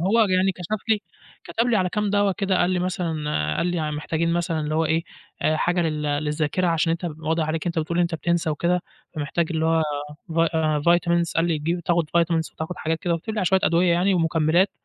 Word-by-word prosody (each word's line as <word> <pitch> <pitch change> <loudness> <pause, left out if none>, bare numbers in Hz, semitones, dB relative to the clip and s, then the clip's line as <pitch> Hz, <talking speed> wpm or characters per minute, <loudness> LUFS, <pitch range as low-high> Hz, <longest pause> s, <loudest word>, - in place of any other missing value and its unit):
هو 200 +7 +3
يعني 185 +1 +2
كَشَف 190 +5 -5
لي، 220 -2 +3 0.4
كَتَب 230 +1 -1
لي 240 -2 +2
على 185 -2 +1
كام 210 +2 -1
دوا 205 -1 +2
كده، 190 -1 0
قال 175 - +2
لي 185 - +1
مثلًا 180 -2 -2 0.4
قال - - 0
لي 165 -4 -1
محتاجين 160 +2 -1
مثلًا 170 -2 -1
اللي 155 0 -2
هو 160 - +2
إيه، 160 +1 0 0.5
حاجة 175 +2 +1
لل 155 -2 -1
للذاكرة 150 +4 0
عشان 165 -1 +1
أنت 170 +2 -4
واضح 160 +1 0
عليك 160 +1 -2
إن 175 - 0
أنت - - +2
بتقول 165 +2 -1
أنت 170 -1 +1
بتنسى 165 +1 0
وكده، 175 +4 0 0.3
فمحتاج 155 +2 -1
اللي 160 -1 0
هو 165 0 +3 0.5
vi 165 0 +3 0.3
vitamins 170 0 +2
قال 165 - +3
لي 165 -3 0
تجيب 170 +4 -1
تاخد 170 -2 0
vitamins 165 -1 0
وتاخد 160 +3 -5
حاجات 160 +1 -2
كده، 175 -1 0
وكَتَب 175 +7 -4
لي - - -3
على - - 0
شوية 190 +1 +3
أدوية 170 +1 +3
يعني 185 +3 +2
ومكمِّلات، 165 +2 +2
170 Hz, 215 wpm, -23 LUFS, 160-180 Hz, 0.5 s, هو